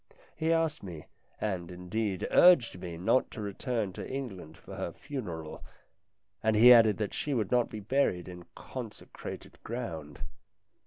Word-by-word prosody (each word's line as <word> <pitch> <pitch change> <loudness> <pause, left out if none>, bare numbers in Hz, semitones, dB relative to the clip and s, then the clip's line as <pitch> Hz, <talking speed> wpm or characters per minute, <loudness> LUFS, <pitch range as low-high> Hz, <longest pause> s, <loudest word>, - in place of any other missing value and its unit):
He 160 +1 0
asked 165 -1 +1
me, 85 -6 -8 0.3
and, 95 -5 -2
indeed, 90 +2 -3
urged 140 - +6
me 85 -2 -6
not 95 +9 +2
to - - -9
return 105 0 -2
to - - -7
England 100 - -6
for - - -12
her - - -3
funeral, 90 - -6 0.8
and 110 0 +2
he 120 +3 +9
added 110 -4 +6
that 105 -2 -2
she 145 -2 -2
would 110 -5 -1
not 125 -1 +3
be 110 - -6
buried 100 -6 +1
in 90 -1 -9
consecrated 120 -5 -8
ground. 80 -11 -6
110 Hz, 150 wpm, -30 LUFS, 90-125 Hz, 0.8 s, he